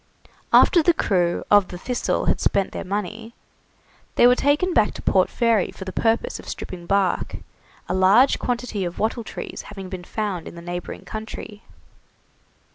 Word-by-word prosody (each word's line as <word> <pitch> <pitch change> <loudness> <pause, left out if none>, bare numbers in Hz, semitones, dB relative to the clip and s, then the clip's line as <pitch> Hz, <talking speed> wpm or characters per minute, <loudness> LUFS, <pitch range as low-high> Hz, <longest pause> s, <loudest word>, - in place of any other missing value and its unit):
After 345 - +6
the 335 +2 +3
crew 175 - +1
of 205 -2 +6
the 180 - -8
'Thistle' 245 +7 -1
had - - +1
spent 195 -1 +1
their - - -5
money, 210 +4 -5 0.8
they - - +5
were 245 - +7
taken 295 +8 +1
back 210 - +2
to - - -7
Port 185 -1 +3
Fairy 230 -5 +2
for 190 - -9
the 190 - -5
purpose 225 0 0
of - - -10
stripping 175 -2 -7
bark, 195 -2 +1 0.5
a - - -2
large 195 +8 +5
quantity 240 -5 -2
of 175 -1 -4
wattle 225 +2 -1
trees - - -7
having 195 -2 -8
been 185 -2 -6
found 200 -3 -4
in - - -9
the 170 - -9
neighbouring 175 0 -6
country. 215 -1 -7
205 Hz, 170 wpm, -23 LUFS, 185-235 Hz, 0.8 s, were